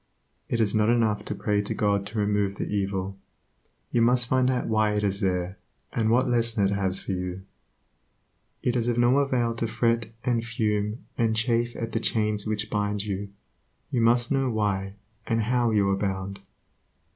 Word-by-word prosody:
It 115 - 0
is 105 -3 +2
not 110 0 +3
enough 115 -3 +2
to - - -3
pray 105 -1 0
to 105 - -3
God 100 -1 +1
to 110 +2 -7
remove 105 -1 +1
the - - -3
evil; 95 -1 -2 0.7
you 120 - +2
must 125 +1 +4
find 130 +1 +2
out 125 -1 0
why 110 -1 +2
it 105 - 0
is 100 -1 0
there, 95 -1 -1 0.3
and 110 -1 +1
what 125 +3 +3
lesson 115 -3 +2
it 95 - +1
has 95 -1 0
for - - -5
you. 90 0 -4 1.2
It 125 - +1
is 120 -1 0
of 120 -1 +1
no 120 +3 +4
avail 125 -4 +1
to 115 0 -2
fret 115 0 0
and 120 -2 +1
fume 110 -2 -1
and 115 -1 +2
chafe 120 +1 +1
at 115 -1 -4
the - - 0
chains 105 -1 0
which 110 0 -1
bind 105 -1 0
you; 100 -1 -4 0.6
you 125 -4 +1
must 120 +1 +3
know 135 -1 +2
why 100 -3 -1 0.3
and 115 -1 +1
how 120 +1 +2
you 105 -3 +2
are 95 - +1
bound. 95 0 -3
110 Hz, 185 wpm, -26 LUFS, 100-120 Hz, 1.2 s, must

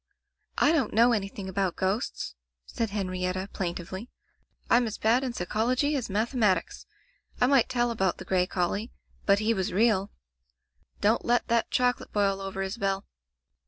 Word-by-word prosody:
"I 295 - +4
don't 280 -12 +1
know 235 +2 +6
anything 200 -2 -2
about 190 -1 -1
ghosts," 190 - -2 0.3
said 225 - -3
Henrietta, 185 -1 -2
plaintively. 185 +4 -4 0.6
"Fm 240 0 +4
as 215 - -5
bad 235 +4 +2
in 255 -2 -2
psychology 245 +10 0
as 255 -6 -2
mathematics. 215 -1 0 0.5
I - - +5
might 260 -2 +4
tell 240 -2 +1
about 190 -5 0
the 190 - -9
gray 180 -1 +1
collie, 195 +5 -2 0.4
but 200 0 +6
he 215 +2 +1
was 190 -4 -1
real. 205 -1 +2 0.9
Don't 215 +3 +3
let 240 0 +1
that 235 -1 +2
chocolate 250 0 0
boil 195 -2 +1
over, 195 0 -4
Isabel." 195 -1 -2
210 Hz, 150 wpm, -28 LUFS, 190-235 Hz, 0.9 s, know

